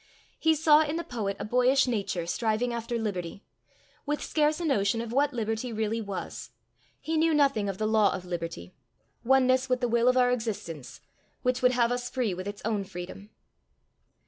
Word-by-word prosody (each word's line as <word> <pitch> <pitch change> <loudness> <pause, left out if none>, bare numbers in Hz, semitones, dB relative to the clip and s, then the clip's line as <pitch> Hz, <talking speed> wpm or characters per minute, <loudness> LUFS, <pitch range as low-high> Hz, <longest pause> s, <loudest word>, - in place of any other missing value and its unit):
He 320 0 +3
saw 310 0 +5
in 305 0 -1
the 340 - -2
poet 215 -10 -3
a - - -4
boyish 250 +4 +3
nature 200 -8 -2
striving 225 +6 0
after 235 0 -3
liberty, 200 -4 -4 0.6
with 295 0 -2
scarce 305 0 +1
a 345 - -3
notion 225 -6 +1
of 230 0 -5
what 280 +2 +2
liberty 225 0 -2
really 220 +1 -1
was: 200 -3 -6 0.5
he 320 0 -2
knew 320 0 +3
nothing 275 -9 +2
of 195 - -4
the 215 - -1
law 215 -2 +3
of 185 -1 -5
liberty 165 - -5 0.5
oneness 260 +1 +3
with 255 0 +2
the 245 - 0
will 235 +1 +2
of 255 0 +4
our 250 -1 +4
existence, 195 - -4 0.4
which 250 0 +1
would 250 0 +4
have 240 -1 +2
us 245 0 -2
free 245 -7 -1
with 185 +2 -6
its 205 0 -7
own 215 -3 0
freedom. 185 +2 -9
235 Hz, 185 wpm, -28 LUFS, 200-255 Hz, 0.6 s, saw